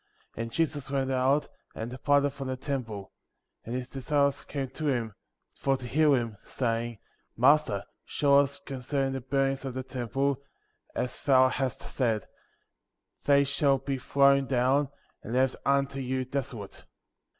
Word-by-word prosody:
2. - - -5
And 115 0 -4
Jesus 145 -2 -1
went 135 -1 0
out, 130 +3 +2 0.3
and 115 +2 -5
departed 140 +2 +2
from 135 -1 -6
the 130 0 -2
temple; 115 -8 -4 0.5
and 115 - -5
his 125 -1 -3
disciples 140 +1 0
came 140 -2 -3
to 150 +4 -4
him, 120 -6 0 0.4
for 135 -1 0
to 130 - -8
hear 150 +3 +4
him, 115 -4 -2
saying: 115 -2 -2 0.4
Master, 125 -5 +4 0.2
show 140 -1 +4
us 140 0 0
concerning 135 0 -2
the 135 - -3
buildings 135 +1 0
of 130 -2 -5
the 130 - -3
temple, 130 +2 -1 0.5
as 125 - -2
thou 130 -2 +5
hast 130 -1 -2
said 115 -6 0 0.5
— - - -46
They 140 0 +5
shall 140 0 +2
be 135 0 -3
thrown 140 +1 +4
down, 130 +2 +2 0.3
and 115 - -6
left 130 +1 +2
unto 140 0 +2
you 130 0 -1
desolate. 130 -6 -5
135 Hz, 155 wpm, -29 LUFS, 125-140 Hz, 0.5 s, thou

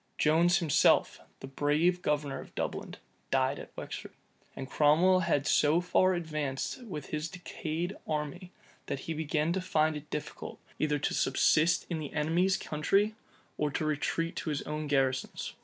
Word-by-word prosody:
Jones 170 +4 +4
himself, 165 -7 +3 0.2
the - - -6
brave 150 +6 +1
governor 150 -3 -1
of - - -14
Dublin, - - -4 0.3
died 135 +1 +1
at - - -9
Wexford. - - -7 0.4
And 130 - -6
Cromwell 160 +7 +4
had 165 -6 +1
so 155 +2 +4
far 180 +1 +3
advanced 155 - -3
with 150 -10 -7
his 155 +1 -2
decayed 175 +1 -4
army, 155 +4 -3 0.4
that 135 - -3
he 165 - -4
began 155 +1 0
to 190 - -1
find 155 -3 +1
it 150 0 -8
difficult, 150 - -6 0.2
either 150 -1 +1
to 145 - -1
subsist 165 +3 +3
in 165 -3 -3
the 150 -2 -6
enemy's 175 +6 +2
country, 195 +9 +1 0.5
or 150 - +1
retreat 155 +3 -1
to - - -3
his 145 -1 -2
own 150 0 -4
garrisons. 135 -2 0
155 Hz, 155 wpm, -30 LUFS, 150-175 Hz, 0.5 s, Jones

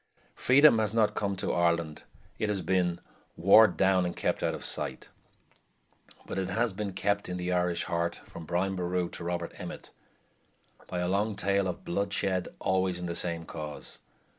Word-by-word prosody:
Freedom 135 -2 +5
has 110 0 0
not 110 -2 +3
come 100 -1 -1
to 95 - -2
Ireland; 85 -3 0 0.3
it 110 - 0
has 100 -3 -1
been 90 -2 +1 0.4
"warred 100 +2 +6
down 95 -1 +3
and 90 -1 -3
kept - - -1
out - - 0
of - - -7
sight"; - - -2 1.2
but - - -4
it 95 -1 -2
has 115 +2 0
been 100 0 -4
kept 100 +1 -1
in 90 - -3
the 90 0 -2
Irish 90 -1 +1
heart, 85 -1 -2
from 85 - -10
Brian 95 +2 0
Boru 90 -1 -1
to - - -7
Robert 85 0 -3
Emmet, - - -8 1.0
by 90 - -3
a 90 - 0
long 100 +3 0
tale 100 -1 +1
of 90 - -5
blood 100 +3 -1
shed 95 -3 0
always 95 -1 0
in 90 - -5
the 85 - -3
same 85 -1 -1
cause. 75 -3 -7
90 Hz, 180 wpm, -29 LUFS, 85-100 Hz, 1.2 s, warred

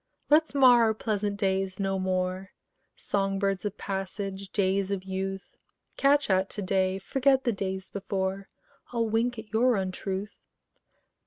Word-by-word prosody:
Let's 310 -1 +4
mar 250 -3 +7
our 220 -1 +1
pleasant 210 -2 -2
days 190 -1 -1
no 195 -1 0
more, 185 +1 -2 0.4
Song 195 -1 -1
birds 195 0 -1
of 205 0 -3
passage, 195 0 -4
days 195 -1 +1
of 195 -2 -2
youth: 190 0 -5 0.4
Catch 285 +1 +3
at 190 0 +2
to 205 - -3
day, 190 0 +1
forget 265 +6 +2
the 240 - +2
days 190 -1 -4
before: 195 0 -3 0.4
I'll 230 -2 0
wink 230 +2 0
at 220 -1 -10
your 245 +2 +4
untruth. 190 +1 -4
195 Hz, 145 wpm, -28 LUFS, 190-220 Hz, 0.4 s, mar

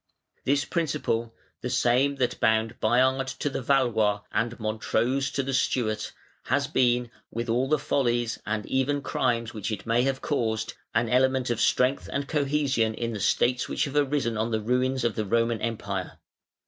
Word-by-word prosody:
_ - - -49
This 140 +1 +2
principle, 120 -8 -1 0.3
the 125 - -3
same 130 +3 +2
that 130 -3 -1
bound 110 0 +1
Bayard 130 +4 +2
to 145 - -2
the - - -3
Valois, 120 -6 +2
and 115 +1 -1
Montrose 115 +5 0
to 140 - -1
the 135 +1 -3
Stuart, 110 -5 0 0.3
has 140 +3 +1
been, 125 -4 +1 0.2
with 115 +1 -4
all 125 +4 +1
the 155 - +4
follies 120 -5 0
and 105 0 -2
even 140 +2 0
crimes 115 -3 0
which 105 0 -4
it 105 - -5
may 115 +1 +2
have 135 +1 0
caused, 110 -6 -1 0.2
an 115 - +2
element 130 +1 +2
of 115 - -1
strength 130 +2 +2
and 140 0 -2
cohesion 140 -6 +1
in 115 0 -3
the 105 - -4
states 125 +5 +1
which - - 0
have 140 -1 -6
arisen 140 -5 +1
on 110 +2 0
the 110 -1 0
ruins 125 +3 0
of 120 -2 +1
the 110 - -2
Roman 115 +1 +1
Empire. 100 -5 -3
120 Hz, 175 wpm, -26 LUFS, 115-135 Hz, 0.3 s, the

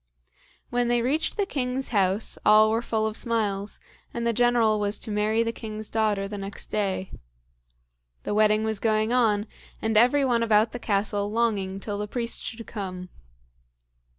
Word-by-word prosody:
When 245 0 +1
they 240 -1 +1
reached 300 - 0
the 405 - +1
king's 265 -6 -3
house, 200 0 +1
all 215 0 +6
were 225 +1 +1
full 220 -2 -1
of 215 -1 -2
smiles, 210 -4 -1 0.3
and 235 0 -4
the 235 - +1
General 235 -2 +3
was 205 0 +1
to 220 - -4
marry 215 +2 +1
the 230 - -1
king's 215 -1 -6
daughter 210 -3 0
the 205 0 -6
next 195 0 -4
day. 190 -2 -1 1.1
The - - -3
wedding 215 0 +3
was 220 -2 -1
going 220 +1 +1
on, 215 -4 +2 0.3
and 220 0 -1
every 250 +6 +4
one 240 -3 +1
about 220 -1 +3
the 245 - -6
castle 205 -1 0
longing 205 -4 0
till 205 0 -4
the 210 - -3
priest 235 +1 -2
should 230 -1 -6
come. 185 -4 -6
215 Hz, 170 wpm, -25 LUFS, 205-235 Hz, 1.1 s, all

